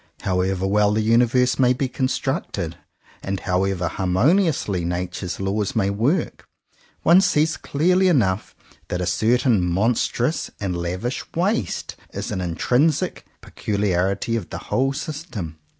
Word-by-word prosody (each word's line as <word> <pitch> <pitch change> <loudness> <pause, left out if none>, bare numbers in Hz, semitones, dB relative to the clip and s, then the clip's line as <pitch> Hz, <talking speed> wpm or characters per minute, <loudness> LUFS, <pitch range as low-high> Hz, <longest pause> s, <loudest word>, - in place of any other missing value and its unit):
How 90 -1 +1
ever 95 0 -1
well 105 +1 +3
the 110 - +1
universe 125 +3 +3
may 125 -1 +5
be 130 +1 -1
constructed, 130 - -2 0.5
and 95 0 -3
however 90 -1 0
harmoniously 100 - +1
Nature's 90 +1 -3
laws 100 +1 -1
may 100 -3 +2
work, 130 - -1 0.6
one 175 +3 +6
sees 155 -3 +2
clearly 180 +6 +2
enough 110 - +1 0.3
that 90 - -3
a 90 - -1
certain 115 0 +2
monstrous 115 - 0
and 95 -3 -2
lavish 90 +9 -3
waste 170 - -1 0.2
is - - -4
an 95 - -2
intrinsic 125 - 0
peculiarity 100 +1 -1
of 110 -7 -4
the - - -5
whole 135 +1 +2
system. 140 - -6
105 Hz, 130 wpm, -22 LUFS, 95-135 Hz, 0.6 s, one